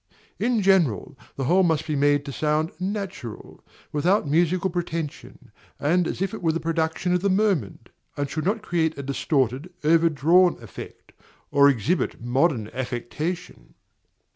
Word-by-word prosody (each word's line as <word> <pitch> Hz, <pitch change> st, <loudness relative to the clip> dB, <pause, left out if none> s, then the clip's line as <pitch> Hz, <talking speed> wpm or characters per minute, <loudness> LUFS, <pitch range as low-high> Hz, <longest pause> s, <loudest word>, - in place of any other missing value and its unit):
In 235 Hz, -3 st, +1 dB
general, 165 Hz, -, +2 dB, 0.2 s
the 135 Hz, -, -3 dB
whole 180 Hz, +8 st, +4 dB
must 160 Hz, -5 st, +1 dB
be 155 Hz, -2 st, -2 dB
made 145 Hz, 0 st, +2 dB
to 140 Hz, -, -5 dB
sound 155 Hz, +3 st, 0 dB
natural, 190 Hz, -, -6 dB, 0.3 s
without 170 Hz, +4 st, +1 dB
musical 175 Hz, +5 st, +1 dB
pretension, 165 Hz, -3 st, -5 dB, 0.3 s
and 170 Hz, +4 st, +2 dB
as 185 Hz, -, -2 dB
if 195 Hz, -, -3 dB
it 220 Hz, -, -6 dB
were 165 Hz, -2 st, +2 dB
the 165 Hz, -, -2 dB
production 165 Hz, +2 st, -1 dB
of 180 Hz, -, +1 dB
the 200 Hz, -, +1 dB
moment; 190 Hz, -, 0 dB, 0.3 s
and 145 Hz, 0 st, -1 dB
should 155 Hz, +2 st, -4 dB
not 215 Hz, +2 st, 0 dB
create 165 Hz, -6 st, 0 dB
a 140 Hz, -, -5 dB
distorted, 135 Hz, +2 st, -1 dB
overdrawn 165 Hz, +2 st, +4 dB
effect, 115 Hz, -4 st, -11 dB, 0.4 s
or 140 Hz, 0 st, +6 dB
exhibit 140 Hz, -, 0 dB
modern 120 Hz, -1 st, +1 dB
affectation. 130 Hz, +8 st, -5 dB
160 Hz, 145 wpm, -24 LUFS, 140-180 Hz, 0.4 s, or